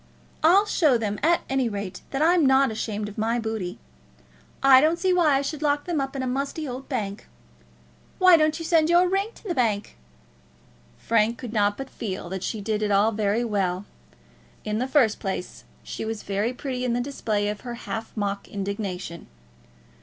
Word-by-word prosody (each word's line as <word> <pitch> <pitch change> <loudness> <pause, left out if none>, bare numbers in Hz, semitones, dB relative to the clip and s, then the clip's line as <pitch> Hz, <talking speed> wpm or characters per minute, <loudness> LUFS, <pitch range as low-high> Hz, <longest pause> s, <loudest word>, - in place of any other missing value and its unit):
I'll 370 +6 +5
show 305 -11 +3
them 210 -2 -3
at 335 +3 +3
any 265 -3 0
rate 200 -3 -5
that 275 +2 0
I'm 340 0 +4
not 265 -1 +4
ashamed 215 -1 -3
of 210 +1 -8
my 225 +2 +1
booty. 220 -6 -3 0.9
I 265 -1 +8
don't 320 +3 +3
see 370 +1 +1
why 325 -6 +4
I 270 - +1
should 300 +1 -4
lock 290 -1 +1
them 335 -5 -1
up 270 0 -4
in 265 - -2
a - - -2
musty 275 +4 -2
old 260 +1 -7
bank. 210 -6 -4 0.9
Why 370 -2 +7
don't 310 -1 +2
you 330 - -6
send 325 -1 +3
your 350 +1 +5
ring 390 +3 0
to - - -17
the 385 -5 -2
bank?" 220 -7 -1 1.0
Frank 230 +1 +1
could 245 -4 -7
not 205 -2 +2
but 270 - -5
feel 190 -8 -6
that 190 0 -4
she 215 +2 -3
did 215 +1 -1
it 210 - 0
all 205 +2 +3
very 215 +1 0
well. 195 -4 -1 0.8
In 215 +1 -1
the 255 - -1
first 265 -6 +3
place 190 -2 -5 0.2
she - - -6
was 220 -1 -4
very 200 +4 -1
pretty 255 -1 -4
in 245 -2 0
the 240 - 0
display 220 -6 -2
of 210 0 -4
her 240 -1 -6
half 225 -1 -6
mock 200 -1 -2
indignation. 195 -4 -5
235 Hz, 190 wpm, -25 LUFS, 210-290 Hz, 1.0 s, I